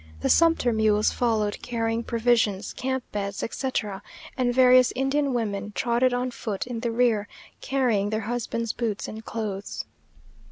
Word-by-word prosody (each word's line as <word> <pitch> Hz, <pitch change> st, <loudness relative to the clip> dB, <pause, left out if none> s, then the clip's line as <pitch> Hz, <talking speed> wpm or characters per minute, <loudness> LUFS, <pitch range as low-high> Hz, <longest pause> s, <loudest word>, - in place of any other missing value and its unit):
The -, -, 0 dB
sumpter 330 Hz, -8 st, +4 dB
mules 215 Hz, -1 st, +3 dB
followed, 220 Hz, -4 st, 0 dB
carrying 230 Hz, -1 st, -1 dB
provisions, 230 Hz, -4 st, +1 dB
camp 260 Hz, 0 st, -2 dB
beds, 200 Hz, -1 st, -3 dB
etc.; 225 Hz, -6 st, -3 dB, 0.3 s
and 250 Hz, -2 st, +1 dB
various 255 Hz, 0 st, +6 dB
Indian 270 Hz, +2 st, +1 dB
women 210 Hz, -4 st, -2 dB
trotted 240 Hz, +1 st, +2 dB
on 250 Hz, +1 st, -1 dB
foot 210 Hz, -4 st, -4 dB
in 245 Hz, -2 st, -5 dB
the 235 Hz, 0 st, -1 dB
rear, 230 Hz, -3 st, +2 dB, 0.3 s
carrying 240 Hz, -7 st, +1 dB
their 215 Hz, +1 st, -1 dB
husbands' 230 Hz, 0 st, -2 dB
boots 225 Hz, -4 st, -2 dB
and 220 Hz, +1 st, -8 dB
clothes. 210 Hz, -3 st, -4 dB
230 Hz, 145 wpm, -25 LUFS, 215-250 Hz, 0.3 s, various